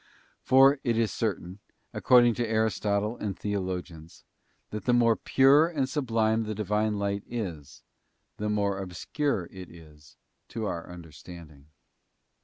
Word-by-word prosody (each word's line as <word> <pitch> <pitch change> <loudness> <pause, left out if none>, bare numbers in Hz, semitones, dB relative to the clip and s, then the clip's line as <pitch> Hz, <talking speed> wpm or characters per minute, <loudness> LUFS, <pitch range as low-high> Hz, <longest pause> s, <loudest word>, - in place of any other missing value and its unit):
For 135 +3 +5
it 120 -3 0
is 115 -4 +1
certain, 95 -3 -3 0.3
ac - - -5
cording 120 -2 +5
to 120 +1 -2
Aristotle 110 -1 0
and 100 -3 -4
theologians, 90 -5 -5 0.5
that 105 - -6
the 125 - +2
more 115 -2 +4
pure 140 +7 +4
and 145 -6 -2
sublime 115 -6 0
the 110 0 -4
Divine 105 +1 -1
Light 100 0 -2
is, 85 - -6 0.5
the 105 0 -3
more 100 -2 0
obscure 95 - -3
it 95 -2 -10
is 75 -3 -17 0.3
to 115 -2 -5
our 85 -4 -5
understanding. 80 -3 -12
105 Hz, 135 wpm, -27 LUFS, 90-115 Hz, 0.5 s, For